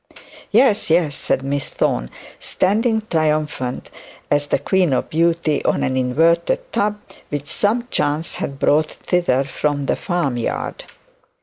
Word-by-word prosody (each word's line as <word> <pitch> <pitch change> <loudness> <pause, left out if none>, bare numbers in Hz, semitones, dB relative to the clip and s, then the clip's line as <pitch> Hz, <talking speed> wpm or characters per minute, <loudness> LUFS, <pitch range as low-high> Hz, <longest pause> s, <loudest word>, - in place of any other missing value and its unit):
'Yes, 220 -9 +3
yes,' 160 -3 +2
said 135 - -1
Miss 140 0 -2
Thorne, - - -1 0.3
standing 220 +3 +1
triumphant 150 -5 -1 0.4
as 145 0 +2
the - - +2
queen 180 +2 +1
of - - -1
beauty, 165 -1 +1
on - - +1
an 130 - 0
inverted 170 - +1
tub 210 0 0 0.3
which 145 -1 -4
some 215 +9 0
chance 150 +3 -1
had 140 - -4
brought 150 +2 +2
hither 175 -8 +2
from 145 +1 -2
the - - +1
farm 175 -9 -1
yard. 115 - -3
155 Hz, 135 wpm, -20 LUFS, 140-185 Hz, 0.4 s, Yes